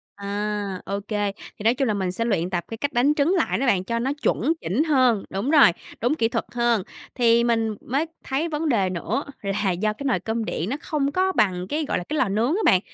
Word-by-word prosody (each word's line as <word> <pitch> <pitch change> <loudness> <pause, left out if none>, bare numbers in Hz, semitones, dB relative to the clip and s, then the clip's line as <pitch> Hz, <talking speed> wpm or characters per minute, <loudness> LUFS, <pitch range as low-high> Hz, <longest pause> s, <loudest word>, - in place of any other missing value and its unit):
À, 205 -1 -3
OK, 200 +1 -4 0.3
thì 210 - -12
nói 225 +2 +4
chung 265 +1 0
là 215 - +1
mình 190 -3 -1
sẽ 230 +5 -2
luyện 185 -6 0
tập 175 -2 -2
cái 225 - -6
cách 285 +4 -2
đánh 265 +5 +3
trứng 300 +4 +2
lại 335 - +1
đó 270 - 0
bạn 195 -6 +3
cho 230 +4 -2
nó 260 +3 0
chuẩn 300 +7 +2
chỉnh 205 - +1
hơn 255 -9 +3
đúng 200 +8 -2
rồi, 290 - +7 0.3
đúng 245 +6 +2
kỹ 225 -7 +2
thuật - - -2
hơn, 235 -4 +1 0.3
thì 235 -2 +4
mình 225 -2 +1
mới 275 +6 -1 0.2
thấy 295 +5 -1
vấn 305 +1 -1
đề 200 -8 +2
nữa 185 - -2 0.2
là 200 0 0
do 210 +5 0
cái 245 - -9
nồi 265 - +2
cơm 225 0 -2
điện 180 -2 -3
nó 265 - -1
không 285 -2 -1
có 375 +4 +1
bằng 190 - +1
cái, 305 0 -1
gọi - - 0
là, - - -3
cái 305 - -4
lò 240 - +2
nướng 220 +6 +1
á - - 0
bạn, 185 - +6
230 Hz, 245 wpm, -24 LUFS, 200-275 Hz, 0.3 s, rồi